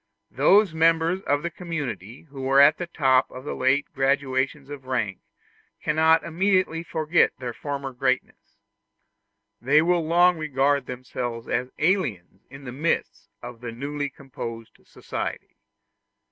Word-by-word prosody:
Those 185 +7 +4
members 165 +3 +2
of 145 +1 +1
the 170 - -3
community 135 - -6
who 140 -4 -10
were 135 +1 +3
at 145 +2 +6
the 175 - -4
top 130 -6 +2
of 130 - -10
the 150 - -4
late 130 +2 +2
gradations 135 0 0
of 140 -2 -8
rank 110 -8 -2 0.6
cannot 160 +1 +3
immediately 185 -1 +1
forget 160 0 +1
their 125 -2 -5
former 140 0 -5
greatness; 130 +1 -2 1.0
they 140 +5 +4
will 175 0 +2
long 175 +1 +4
regard 140 -2 +1
themselves 125 -2 -5
as 125 +1 -1
aliens 125 - -1
in 135 +1 -12
the 125 - -6
midst 120 -7 -2
of 120 -1 -9
the 120 -1 -5
newly 145 +4 -4
composed 115 -4 -9
society. - - -6
140 Hz, 135 wpm, -24 LUFS, 130-160 Hz, 1.0 s, at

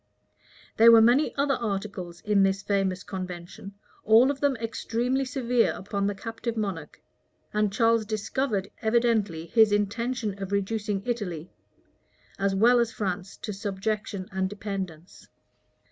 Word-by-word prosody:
There 230 +1 +8
were 230 - +9
many 240 +7 +4
other 280 0 +1
articles 195 -6 -4
in 205 -1 +2
this 195 0 +1
famous 195 -2 0
convention, 185 +1 -7 0.3
all 230 +5 +6
of 280 - -6
them 285 -2 +2
extremely 235 +3 -2
severe 250 -2 +1
upon 200 0 -3
the 205 - -2
captive 225 +2 -5
monarch; 190 -8 -4 0.5
and 210 -1 +1
Charles 230 +1 +3
discovered 215 -1 -2
evidently 220 -7 +1
his 220 +5 +4
intention 210 0 -1
of 195 0 -5
reducing 200 0 -1
Italy, 185 -9 -4 0.9
as 195 0 +1
well 240 +5 +5
as 235 -1 +1
France, 195 -2 -4
to 210 - -5
subjection 200 -1 -3
and 190 -1 -1
dependence. 195 -5 -7
210 Hz, 130 wpm, -26 LUFS, 195-230 Hz, 0.9 s, were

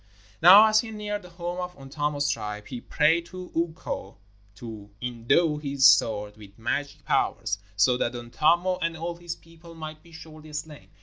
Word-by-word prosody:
Now 190 +6 +10
as 215 0 +4
he 225 - -3
neared 210 -1 -4
the 180 - -13
home 175 +1 -5
of 180 0 -5
Untamo's 145 +1 -2
tribe, 105 -5 -3
he 125 -2 -7
prayed 165 +3 +2
to 185 0 -9
Ukko 160 - -3 0.4
to 110 -4 -9
endow 125 +6 +1
his 140 -3 0
sword 105 -5 +4
with 100 -2 -14
magic 140 +5 -3
powers, 95 +3 0 0.2
so 115 +6 +4
that 120 0 -1
Untamo 170 +10 +1
and 165 -1 -1
all 170 +1 -4
his 170 -1 -6
people 165 0 -16
might 155 -1 -8
be 170 - -19
surely 155 -1 -12
slain. 150 0 -7
155 Hz, 170 wpm, -26 LUFS, 125-170 Hz, 0.4 s, Now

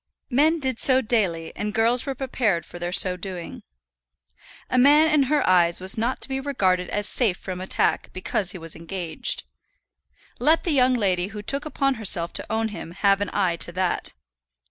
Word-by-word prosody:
Men 310 +6 +3
did 260 -4 -2
so 260 -1 +4
daily, 185 -8 -1
and 210 +1 -4
girls 235 +4 +2
were 270 - -3
prepared 235 -9 -1
for 175 - -11
their 175 0 -4
so 185 0 +6
doing. 180 -1 -8 1.1
A 255 - +1
man 295 +4 +6
in 295 -2 +4
her 300 -1 +1
eyes 175 -2 +3
was 185 +1 0
not 235 +3 -2
to - - -2
be 265 0 -3
regarded 190 -10 0
as 205 0 -2
safe 215 -8 +1
from 185 -1 -7
attack 185 - 0
because 185 0 -3
he 195 - -7
was 165 -2 -7
engaged. 170 - -2 1.0
Let 320 +2 +3
the 345 - -1
young 255 -3 +3
lady 185 -5 0
who 210 0 -9
took 275 +7 -3
upon 275 -2 0
herself 175 -5 +2
to - - -3
own 220 0 -1
him 190 -5 -8
have 195 +1 +2
an 205 - -2
eye 185 -4 0
to 170 - +1
that. 185 0 -2
205 Hz, 190 wpm, -23 LUFS, 180-260 Hz, 1.1 s, so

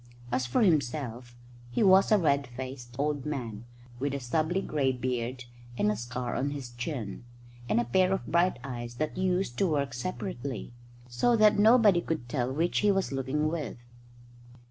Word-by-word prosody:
As 125 0 0
for 175 - +2
himself, 125 - 0 0.3
he 120 - +1
was 190 +1 +6
a 215 - +7
red 140 -6 +2
faced 125 0 -8
old 145 -1 -1
man, 120 -7 -5 0.3
with 140 +1 -1
a - - -2
stubbly 155 +8 0
grey 140 -3 +1
beard 125 0 -3 0.3
and 105 - +2
a - - -1
scar 120 +2 -4
on 140 - 0
his 140 -4 -6
chin, 120 -4 -5 0.5
and 110 - +3
a - - +2
pair 185 +10 +3
of 195 - -1
bright 175 +2 +2
eyes 120 -2 -6
that 155 +4 -2
used 180 -8 0
to 195 - +3
work 140 -5 0
separately, 135 -3 -5 0.3
so 180 - +2
that 215 -2 +5
nobody 215 -4 +6
could 160 -8 -3
tell 125 0 -1
which 165 +6 +1
he 210 - +3
was 195 -4 0
looking 135 +3 -1
with. 155 -7 -3
140 Hz, 170 wpm, -29 LUFS, 120-175 Hz, 0.5 s, a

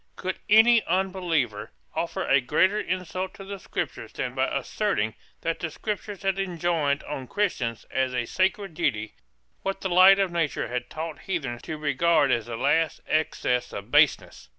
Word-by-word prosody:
Could 185 0 -4
any 225 +2 +7
unbeliever 170 - 0 0.2
offer - - -2
a 135 0 +4
greater 185 +11 +2
insult 185 0 -3
to 195 - -9
the 200 0 -7
Scriptures - - -5
than - - -4
by - - +1
asserting 155 - -1 0.3
that 165 0 -2
the 170 - -3
Scriptures 205 +3 -5
had 195 0 0
enjoined 170 -6 0
on 135 -3 -6
Christians 125 - -1
as 130 -1 0
a 120 -1 0
sacred 190 - 0
duty 105 -7 -1 0.5
what 195 0 -3
the 190 - -2
light 185 +2 +8
of 195 -2 +1
nature 165 -4 -1
had 125 0 -3
taught 160 0 -5
heathens 135 -11 -3
to 155 - -5
regard 150 0 +2
as 120 -2 0
the 115 -1 -5
last 165 +6 +1
excess 125 -5 0
of - - -8
baseness? - - +2
170 Hz, 165 wpm, -26 LUFS, 135-190 Hz, 0.5 s, light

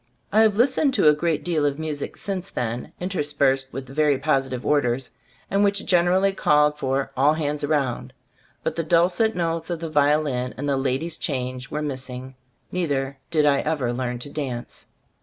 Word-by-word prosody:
I 215 - +5
have 215 -2 +4
listened 265 +3 +3
to - - +4
a - - +6
great 160 +1 -1
deal 165 -4 0
of 145 -1 +1
music 155 -2 -4
since 195 -1 -4
then, 120 0 -3
interspersed 145 -7 0
with 130 +1 -6
very 145 +1 +2
positive 135 -3 0
orders, 130 -3 +1 0.4
and 200 +2 +2
which 200 0 +1
gen 175 -2 +4
erally 190 +2 +2
called 150 -3 +3
for 135 0 -1
"all 145 +4 +4
hands 150 -1 -2
round" 135 -4 -1 0.5
but - - -1
the 170 - -1
dulcet 175 +7 +2
notes 165 -1 -2
of 170 -2 -2
the 165 -1 -5
violin 145 -4 +1
and 145 +3 -3
the 140 - +2
"ladies 135 +5 -1
change" 125 -2 -3
were 150 0 -3
missing. 130 -2 -5 0.4
Neither 140 -6 -1
did 155 -3 +2
I 140 -1 +4
ever 145 -6 -1
learn 125 0 -2
to - - -9
dance. 130 -5 -5
150 Hz, 175 wpm, -24 LUFS, 135-165 Hz, 0.5 s, a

